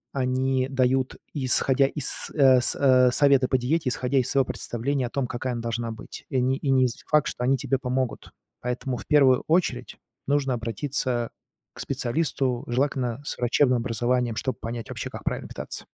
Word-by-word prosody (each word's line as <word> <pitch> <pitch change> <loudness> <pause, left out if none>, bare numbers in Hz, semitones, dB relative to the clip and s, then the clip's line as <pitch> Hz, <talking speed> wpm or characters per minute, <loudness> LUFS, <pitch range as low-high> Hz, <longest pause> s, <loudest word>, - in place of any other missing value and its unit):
они 130 0 0
дают, 130 0 +1 0.2
исходя 135 -1 +3
из, 145 -1 0
э, 130 -4 +6
с - - +2
э, 130 -2 +5
советы 140 -1 +4
по 130 - +2
диете, 130 +3 0
исходя 130 +1 0
из 125 - -1
своего 135 -2 +2
представления 125 +3 -2
о - - -9
том, 135 -1 -2
какая 125 +1 -3
она 120 - -4
должна 115 0 -3
быть. 110 - -10
И 130 - 0
не 130 +2 +1
и 140 - -3
не 130 -1 +4
з 120 - -7
факт, 150 -3 +3
что 125 - -4
они 135 +2 +3
тебе 135 +1 -1
помогут. 130 -1 -3 0.3
Поэтому, 125 +1 -3
в - - -10
первую 135 -4 +4
очередь, 155 -7 0 0.3
нужно 140 -2 +1
обратиться 120 +1 -2 0.4
к - - -15
специалисту, 130 -1 -1
желательно, 130 0 -1
с - - -4
врачебным 125 +1 +3
образованием, 120 0 0
чтоб 130 -3 -3
понять 115 0 -6
вообще, - - -5
как - - -9
правильно - - -3
питаться. - - -7
130 Hz, 180 wpm, -25 LUFS, 125-135 Hz, 0.4 s, э